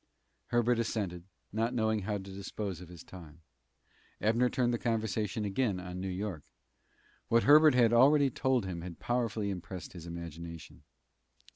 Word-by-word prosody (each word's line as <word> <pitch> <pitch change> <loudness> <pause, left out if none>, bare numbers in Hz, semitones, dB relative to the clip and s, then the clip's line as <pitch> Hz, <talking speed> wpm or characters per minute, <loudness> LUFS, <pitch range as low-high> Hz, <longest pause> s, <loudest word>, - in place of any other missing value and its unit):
Herbert 120 0 +2
assented, 95 -6 -2 0.3
not 115 +3 0
knowing 110 -2 +1
how 105 +1 -3
to 100 -2 -3
dispose 95 -1 -6
of 90 - -11
his 85 -3 -11
time. 85 -3 -13 0.8
Abner 115 +3 +2
turned 120 -1 +1
the 120 - -1
conversation 110 -2 -1
again 100 -1 0
on 90 0 -6
New 95 - -3
York. 95 -3 -4 0.9
What 115 0 +3
Herbert 150 0 +7
had 120 -2 +4
already 140 +3 +5
told 130 -4 +1
him 90 -3 -5
had 85 -2 -8
powerfully 115 -4 -1
impressed 90 -1 -7
his 85 -2 -9
imagination. 85 -1 -8
105 Hz, 150 wpm, -31 LUFS, 90-120 Hz, 0.9 s, Herbert